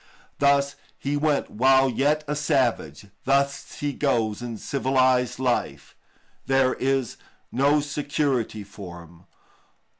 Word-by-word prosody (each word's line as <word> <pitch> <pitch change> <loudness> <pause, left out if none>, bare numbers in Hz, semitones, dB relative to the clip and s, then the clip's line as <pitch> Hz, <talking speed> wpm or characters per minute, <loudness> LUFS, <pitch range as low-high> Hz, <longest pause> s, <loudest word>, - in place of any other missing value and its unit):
Thus 140 0 +2 0.2
he 140 +1 -2
went 145 -1 0
while 130 +3 +4
yet 145 +5 +1
a 150 - -1
savage, 130 - 0 0.2
thus 140 +1 0
he 145 -1 -3
goes 115 -7 0
in 120 -2 -5
civilised 130 0 +1
life; 125 -2 -2 0.5
there 135 -1 +3
is 135 -2 -1 0.3
no 145 +3 +3
security 140 -6 -2
for 95 -4 -10
him. 85 +1 -19
135 Hz, 115 wpm, -24 LUFS, 120-140 Hz, 0.5 s, while